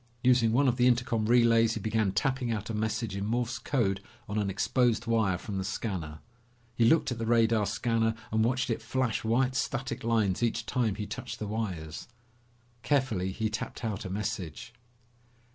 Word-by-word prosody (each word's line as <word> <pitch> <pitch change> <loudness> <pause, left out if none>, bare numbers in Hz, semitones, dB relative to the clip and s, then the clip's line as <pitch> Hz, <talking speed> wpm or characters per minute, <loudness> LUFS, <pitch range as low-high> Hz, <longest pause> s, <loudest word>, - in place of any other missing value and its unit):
Using 125 -3 +4
one 135 +4 +3
of 125 -1 +2
the 125 0 +4
intercom 120 -3 +1
relays 115 -1 +4
he - - -3
began 110 -3 0
tapping 125 +4 0
out 110 0 -3
a - - -4
message 110 -1 -2
in 100 - -3
Morse 120 +3 -1
code 105 -7 0 0.3
on 105 0 -1
an 100 -1 0
exposed 115 +3 +1
wire 110 -6 +2
from 95 +1 -5
the - - -2
scanner. 90 -7 -4 0.5
He 115 0 +2
looked 160 +3 +4
at 120 - -4
the 115 - -2
radar 115 -2 +3
scanner 115 +1 0 0.2
and 110 0 +2
watched 125 +1 +1
it 115 - -2
flash 120 +1 -1
white 125 +4 +2
static 130 0 -2
lines 110 -5 +1
each 115 -1 0
time 115 -6 0
he 105 0 -4
touched 120 0 -6
the 110 - -4
wires. 95 -8 -4 0.7
Carefully 115 -11 0
he 110 +3 -1
tapped 110 +2 -5
out 105 -3 -3
a 95 - -5
message. 100 0 -4
115 Hz, 180 wpm, -29 LUFS, 105-120 Hz, 0.7 s, Using